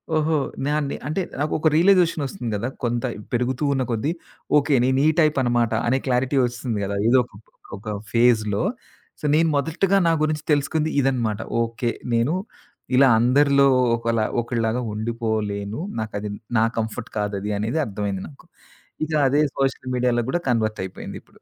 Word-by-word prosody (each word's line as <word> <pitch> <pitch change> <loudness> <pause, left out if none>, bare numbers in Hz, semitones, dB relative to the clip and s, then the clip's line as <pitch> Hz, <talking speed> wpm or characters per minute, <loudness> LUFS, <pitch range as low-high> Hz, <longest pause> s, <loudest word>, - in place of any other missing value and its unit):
ఓహో! 155 0 +2 0.3
నాన్నే 150 -1 -1
అంటే 160 +6 -1 0.2
నాకొక 155 +1 +1
రియలైజేషన్ 170 -3 +4
ఒస్తుంది 120 -3 -5
కదా! 115 +5 -3 0.2
కొంత 120 0 -1 0.3
పెరుగుతూ 125 +4 0
ఉన్న 130 -1 0
కొద్దీ 115 +8 0 0.5
ఓకే. 145 0 +2
నేను 130 +1 +2
ఈ - - +6
టైప్ 155 -3 +3
అనమాట 120 -2 +1 0.2
అనే 130 +2 +3
క్లారిటీ 130 +2 +1
ఒస్తుంది 120 -3 -3
కదా! 100 +1 -3
ఏదో 130 +2 +5
ఒకప్పుడు 110 -2 -18 0.2
ఒక 105 +1 -6 0.2
ఫేజ్‌లో. 115 -2 +3 0.6
సో - - -5
నేను 165 0 +3
మొదటిగా 180 +6 +1
నా 165 - +4
గురించి 155 0 -1
తెలుసుకుంది 150 +2 +1
ఇదనమాట. 120 -5 0 0.2
ఓకే. 115 +1 -1 0.2
నేను 120 +8 +2 0.6
ఇలా 135 +1 +6
అందరిలో 140 +3 +4 0.3
ఒకలా 115 -2 0 0.2
ఒకళ్లాగా 115 0 -1
ఉండిపోలేను. 110 -1 -2 0.2
నాకది 105 -1 -4 0.3
నా 110 - +4
కంఫర్ట్ 110 +1 -3
కాదది 105 0 -2
అనేది 115 +9 -1
అర్థమైంది 100 -2 -3
నాకు. 145 +3 -18 0.6
ఇగ 160 - -9 0.2
అదే 145 +3 +3 0.2
సోషల్ 135 -1 -1
మీడియాలో 125 -1 +1
కూడా 175 - +1
కన్వర్ట్ 110 -2 0
అయిపోయింది 95 - -8
ఇప్పుడు. - - -25
125 Hz, 150 wpm, -23 LUFS, 110-145 Hz, 0.6 s, ఈ